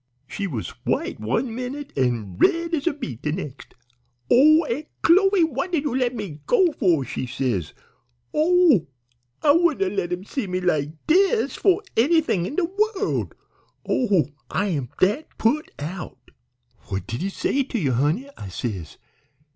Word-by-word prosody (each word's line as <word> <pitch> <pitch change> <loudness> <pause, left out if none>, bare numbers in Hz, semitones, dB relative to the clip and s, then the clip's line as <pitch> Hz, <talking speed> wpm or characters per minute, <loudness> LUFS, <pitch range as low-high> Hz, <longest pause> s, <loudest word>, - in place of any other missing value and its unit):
"She 200 +8 -4
was 125 - -4
white - - -1
one 225 - -1
minute 255 +4 -6
an' 120 -8 -1
red 335 0 +2
as 310 -1 -1
a 340 - +3
beet 130 - -6
the 150 - -1
nex'. 150 -5 -6 0.6
'Oh, 310 +5 +6
Aunt 295 +4 -3 0.2
Chloe, 385 +1 +5
what 310 +2 -1
did 320 -5 +1
you 290 - -1
let 250 -1 0
me 195 -9 -6
go 380 -8 +4
for?' 175 - +1
she 130 - -4
says. 120 - -2 0.6
'Oh! 320 - +4 0.6
I 290 - +6
wouldn't 295 - +2
'a' - - -6
let 175 -3 -1
him 180 +1 -3
see 220 +1 -4
me 185 0 -1
like 155 -5 +1 0.2
dis 390 +7 +3
for 390 +1 +2
anythin' 260 - +2
in 280 - -6
de 365 - +2
wo'ld. 400 +3 -1 0.5
Oh, 200 - +2 0.2
I'm 165 - -1
dat 210 +12 +2
put 290 +8 +1
out.' 165 +4 -7 0.6
"'What 95 -2 -3
did 115 +6 -5
he 195 - -1
say 275 +7 0
to 260 -2 -3
ye, 155 -10 0
honey?' 155 - 0
I 100 - -8
says. 95 -5 -5
225 Hz, 165 wpm, -23 LUFS, -, 0.6 s, Oh